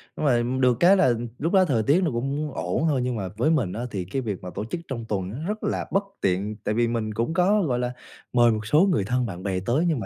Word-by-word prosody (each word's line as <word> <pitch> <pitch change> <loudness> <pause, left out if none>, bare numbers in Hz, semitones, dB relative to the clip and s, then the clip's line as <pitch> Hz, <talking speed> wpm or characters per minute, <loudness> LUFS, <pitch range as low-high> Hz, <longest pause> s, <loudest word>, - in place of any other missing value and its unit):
nhưng - - -3
mà 120 -4 +3 0.2
được 125 -2 +3
cái 190 +3 +6
là 150 -10 +4 0.3
lúc 165 +6 -1
đó 190 -1 +6
thời 125 -9 +1
tiết 145 - +3
nó 165 - +1
cũng 140 +5 -2
ổn 90 - -1
thôi, 140 -5 +1
nhưng 125 -1 -1
mà 100 -4 -3
với 150 +8 +2
mình 120 - +1
á 115 - -4
thì 95 -3 -3
cái 130 +9 -3
việc 105 -6 -4
mà 90 - -5
tổ 105 - -3
chức 165 +9 -5
trong 115 -4 -5
tuần 105 - -4
rất 215 +1 -3
là - - -1
bất 195 - +2 0.2
tiện, 100 +3 0
tại 105 - 0
vì 120 0 +2
mình 115 -2 -2
cũng 115 +9 -1
có, 195 +5 +3
gọi 130 -9 0
là, 125 0 -2 0.4
mời 120 -1 +5
một 110 -1 -3
số 150 +8 +3
người 150 - +1
thân 125 +3 0
bạn 95 -5 -6
bè 95 -2 -1
tới, 140 +8 +1
nhưng 160 -6 +1
mà 110 - -4
120 Hz, 280 wpm, -25 LUFS, 110-155 Hz, 0.4 s, cái